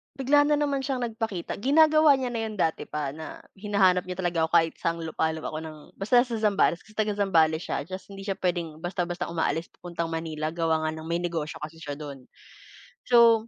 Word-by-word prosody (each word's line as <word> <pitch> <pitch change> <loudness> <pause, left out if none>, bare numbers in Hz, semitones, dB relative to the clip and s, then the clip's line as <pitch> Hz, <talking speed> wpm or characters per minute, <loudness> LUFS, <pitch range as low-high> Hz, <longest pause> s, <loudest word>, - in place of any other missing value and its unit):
bigla 280 +2 +4
na 300 - +4
naman 285 -2 0
siyang 260 -3 -1
nagpakita, 220 -7 -4
ginagawa 310 +3 +6
niya 250 -2 -2
na 230 - -2
'yon 215 - -7
dati 160 -2 +1
pa, 150 -2 -3
na, 160 0 -8 0.2
hinahanap 190 -3 +2
niya 180 - -4
talaga 175 -3 +1
ako 160 - 0
kahit 165 -1 +4
sang 165 0 -1
lupalop 160 0 -2
ako 155 - -4
ng 155 -1 -8 0.2
basta 240 +5 +4
sa 245 -3 -4
Zambales, 200 -5 +2
kasi 215 0 -20
taga-Zambales 195 -7 +2
siya, - - -2
tas 185 +1 -6
hindi 195 0 -8
siya 195 - 0
puwedeng 170 -4 -2
basta-basta 175 0 -2
umaalis 165 0 -1
papuntang 170 -1 -4
Manila, 160 -1 -3
gawa 160 -2 +1
nga - - 0
nang 160 0 -8
may 170 +1 0
negosyo 165 -3 -3
kasi 160 +1 -8
siya 145 -1 -4
do'n. 140 -3 -8 0.8
So, 230 -2 +6
175 Hz, 195 wpm, -27 LUFS, 160-220 Hz, 0.8 s, ginagawa